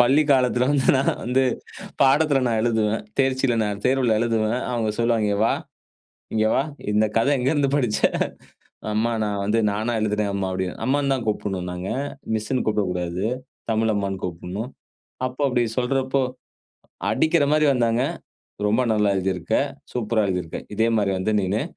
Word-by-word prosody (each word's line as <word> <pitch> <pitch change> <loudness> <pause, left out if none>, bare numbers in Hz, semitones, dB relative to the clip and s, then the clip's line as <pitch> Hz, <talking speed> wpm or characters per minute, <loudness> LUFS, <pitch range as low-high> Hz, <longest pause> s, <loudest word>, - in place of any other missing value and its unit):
பள்ளிக் 140 +5 +4
காலத்தில 125 -2 +3
வந்து 140 -2 +2
நான் 135 - +1
வந்து 130 +2 +2 0.6
பாடத்தில் 140 -1 +4
நான் 115 -2 +1
எழுதுவேன். 110 -2 +1 0.2
தேர்ச்சில 130 -2 +2
நான் 105 -1 -3
தேர்வுல 130 -3 +2
எழுதுவேன். 115 0 +1
அவுங்க 115 -3 0
சொல்லுவாங்க 115 -2 +2
"இஙக 100 - -1
வா. - - +3 0.8
இங்கே 110 0 +2
வா, - - +2 0.3
இந்த 105 +1 +3
கதை 140 +6 +3
எங்கேருந்து 140 +2 +1
படிச்ச?" 125 -6 0 0.9
அம்மா 110 +2 +1
நான் 105 -1 -2
வந்து 105 +2 +1
நானா 110 +4 -1
எழுதுனேன் 105 -1 0
அம்மா" 100 -1 -1
அப்படின் 95 -1 -3
அம்மான்னு 140 +1 +2
தான் 130 -3 -3
கூப்பிடணும் 95 -4 -2
நாங்க. 90 +2 -5 0.5
மிஸ்ன்னு 110 +4 -1
கூப்பிடக்கூடாது. 90 -3 -1 0.5
தமிழ் 110 0 +2
அம்மான்னு 95 -2 -2
கூப்பிடணும். 90 +7 -5 0.6
அப்போ 130 +3 -5
அப்படி 125 -1 +1 0.2
சொல்றப்போ, 130 +1 +1 0.9
அடிக்கிற 160 +7 +3
மாரி 155 0 +4
வந்தாங்க. 120 -1 +2 0.7
"ரொம்ப 110 +5 +2
நல்லா 105 -2 +2
எழுதியிருக்க 95 +2 -1 0.4
சூப்பரா 115 -2 +1
எழுதியிருக்க. 90 -3 -3 0.2
இதே 115 +1 +3
மாரி 100 -2 +1
வந்து 105 +3 0
நீனு 100 +5 0
115 Hz, 145 wpm, -23 LUFS, 105-130 Hz, 0.9 s, பள்ளிக்